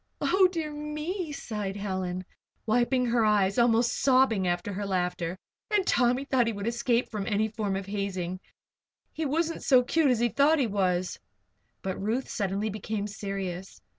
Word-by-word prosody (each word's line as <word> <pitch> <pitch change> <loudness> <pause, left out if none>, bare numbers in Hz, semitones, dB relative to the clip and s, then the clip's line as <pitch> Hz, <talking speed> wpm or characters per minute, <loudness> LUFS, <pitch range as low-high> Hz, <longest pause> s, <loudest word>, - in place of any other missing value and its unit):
"Oh, 375 0 +4
dear 320 -4 -3
me!" 300 +4 -4
sighed 210 -8 -4
Helen, 185 -2 -3 0.4
wiping 245 +3 +2
her 235 -1 +2
eyes 205 -1 +3
and - - +7
almost 235 +1 +3
sobbing 255 -8 +3
after 175 +3 -1
her 200 +1 -3
laughter. 180 -2 -1 0.3
"And 415 -3 +2
Tommy 250 0 +2
thought 255 -4 +2
he 230 - 0
would 200 0 -5
escape 235 +1 +1
any 210 +1 0
form 210 -3 -2
of 195 0 -3
hazing! 190 -3 -3 0.7
He 315 -1 -2
wasn't 330 +3 -1
so 255 -3 +5
cute 310 +3 +2
as 250 - +3
he 240 +1 +2
thought 285 +6 +4
he 275 - +2
was." 185 -4 0 0.6
But 190 0 -3
Ruth 230 +6 -1
suddenly 200 +2 -1
became 210 0 -3
serious. 195 -3 -5
215 Hz, 165 wpm, -28 LUFS, 195-260 Hz, 0.7 s, and